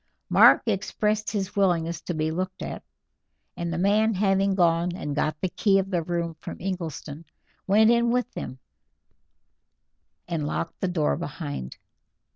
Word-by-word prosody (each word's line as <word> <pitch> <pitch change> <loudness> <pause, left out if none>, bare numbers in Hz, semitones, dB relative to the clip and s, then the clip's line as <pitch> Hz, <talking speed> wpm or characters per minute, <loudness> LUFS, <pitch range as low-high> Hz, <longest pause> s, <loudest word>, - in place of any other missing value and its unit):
Mark - - +7
expressed 210 0 0
his 200 -2 -3
willingness 170 -4 +1
to 175 - -4
be 155 0 0
looked 185 +3 -4
at, - - -5 0.7
and 170 -1 -3
the 170 - -2
man 210 +4 +3
having 195 0 +2
gone 170 -1 +2
and 150 -6 -4
got 155 0 -1
the 185 - 0
key 195 +2 +2
of 195 0 -1
the 175 -2 +1
room 170 0 -3
from - - -7
Ingleston, 165 -5 -5 0.4
went 215 +3 +5
in 235 0 +3
with 250 +1 0
them 130 - -6 1.7
and 155 -3 -2
locked 165 - -4
the 190 - +1
door 155 - 0
behind. 65 -3 -6
180 Hz, 150 wpm, -25 LUFS, 165-200 Hz, 1.7 s, Mark